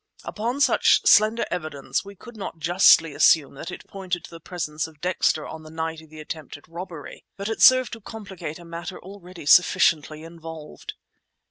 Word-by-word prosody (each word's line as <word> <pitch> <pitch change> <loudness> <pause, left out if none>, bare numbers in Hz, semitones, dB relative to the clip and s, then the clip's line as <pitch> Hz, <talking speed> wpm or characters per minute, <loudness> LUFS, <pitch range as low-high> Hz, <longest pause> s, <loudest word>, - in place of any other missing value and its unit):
Upon 235 +6 -3
such - - +4
slender 215 +2 +5
evidence 155 -5 -3
we 200 0 -12
could 240 +5 -13
not 195 -5 -7
justly 165 -1 +5
assume 150 0 +4
that 150 +5 -8
it 175 - -9
pointed 185 -3 -5
to - - -12
the 165 - -10
presence 160 -2 -4
of 155 -2 -18
Dexter 175 -3 0
on 160 - -9
the 155 - -12
night 160 0 -4
of 160 - -18
the 155 0 -12
attempted 150 -2 -9
robbery, 170 -2 -9
but 200 0 -4
it 225 - -4
served 255 -1 +6
to 230 - -8
complicate 195 -8 -8
a 175 - -14
matter 170 +2 -7
already 185 -3 -12
sufficiently 155 -1 +3
involved. 165 -2 -10
170 Hz, 175 wpm, -24 LUFS, 155-195 Hz, -, served